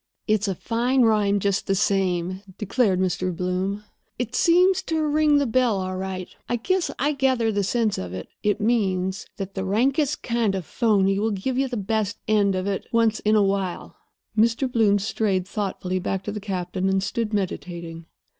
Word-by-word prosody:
"It's 215 -1 +2
a 195 - -1
fine 245 +6 +1
rhyme, 210 -3 +3
just 200 0 0
the 195 - +2
same," 185 -2 0 0.2
declared 210 -2 +1
Mr. 185 -1 -1
Bloom. 185 +3 -2 0.3
"It 245 -1 -3
seems 360 +6 +4
to 320 -3 -1
ring 300 0 +3
the 285 - +2
bell, 235 -4 +2
all 185 0 -3
right. 185 -1 -4 0.2
I 240 - +1
guess 360 +9 0
I 290 +3 +1
gather 260 -5 +1
the 205 -1 0
sense 220 +1 0
of 90 -1 -5
it. 95 0 -6
It 210 0 +1
means 195 -4 0
that 195 -1 -5
the 190 - -3
rankest 265 +9 +1
kind 230 -4 0
of 190 - -3
a - - -25
phony 195 -4 +2
will 220 +2 +1
give 215 +5 -2
you 270 - +1
the 245 -2 -4
best 210 0 -1
end 205 -3 +3
of 185 0 -2
it 200 -1 -2
once 230 -2 +2
in 215 +1 +2
a 210 - +5
while." 195 -2 -2 0.4
Mr. 230 +4 +2
Bloom 220 -5 +3
strayed 195 -2 -1
thoughtfully 190 -3 -2
back 190 +1 -2
to 210 - -4
the 210 - -4
captain, 190 -1 -2
and 190 0 +1
stood 230 0 -2
meditating. 170 -4 -4
205 Hz, 190 wpm, -24 LUFS, 190-235 Hz, 0.4 s, a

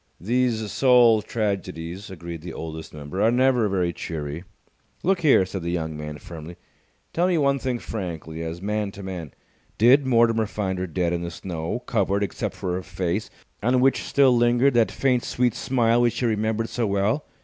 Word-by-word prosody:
"These 115 +1 0
soul 120 -4 +5
tragedies," 95 -4 -3
agreed 85 -3 -7
the 85 0 -7
Oldest 80 0 -7
Member, 75 +5 -5
"are 110 - +5
never 125 -2 +3
very 90 -3 0
cheery." 75 0 -5 0.6
"Look 190 +1 +2
here," 140 - +5
said 95 0 -5
the 85 - -3
young 80 -3 -2
man, 75 0 -6
firmly, 85 +2 -9 0.6
"tell 175 +2 +2
me 180 -2 +2
one 140 -2 +2
thing 130 -2 -1
frankly, 85 -8 -6
as 85 +2 -5
man 105 0 -1
to 100 - -9
man. 90 -6 -6 0.5
Did 130 +5 +5
Mortimer 115 -3 +3
find 95 -3 -3
her 95 - -2
dead 85 0 -1
in 85 - -1
the 85 - -4
snow, 85 +5 -4
covered 100 -2 +1
except 95 - -3
for 90 - -3
her 90 - -2
face, 90 +2 -3 0.3
on 125 +4 +2
which 135 +1 +3
still 135 -3 +4
lingered 120 +3 +3
that 115 -2 +3
faint, 130 -3 +1
sweet 125 -2 +1
smile 120 -2 +2
which 120 -1 +1
he 125 - 0
remembered 110 0 0
so 120 -3 -1
well? 100 +8 0
105 Hz, 180 wpm, -24 LUFS, 85-120 Hz, 0.6 s, soul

